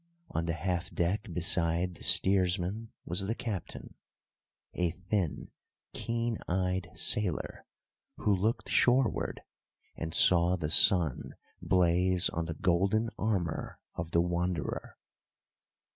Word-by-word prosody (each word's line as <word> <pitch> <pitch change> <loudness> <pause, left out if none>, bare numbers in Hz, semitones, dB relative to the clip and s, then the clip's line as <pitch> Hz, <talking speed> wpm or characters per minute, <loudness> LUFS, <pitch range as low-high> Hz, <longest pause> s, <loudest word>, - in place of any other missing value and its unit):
On 85 +1 -2
the 85 - 0
half 90 +1 -2
deck 95 +4 -2
beside 85 +1 +1
the - - -11
steersman 95 +3 +1
was 90 +3 -1
the 115 - -1
captain, 105 -8 -6 0.8
a 90 -1 0
thin, 90 0 -3 0.4
keen 115 -1 -2
eyed 90 0 -1
sailor, 95 -7 -1 0.5
who 105 - +1
looked 110 +5 -1
shoreward 125 -1 +1 0.5
and 80 0 -5
saw 90 0 +5
the 80 -4 -3
sun 85 -6 +4 0.3
blaze 90 0 +2
on 85 0 -3
the 80 -1 -5
golden 95 +8 +1
armour 95 -7 -2 0.2
of 80 - -5
the 85 - +2
Wanderer. 85 -1 -3
90 Hz, 115 wpm, -30 LUFS, 85-100 Hz, 0.8 s, saw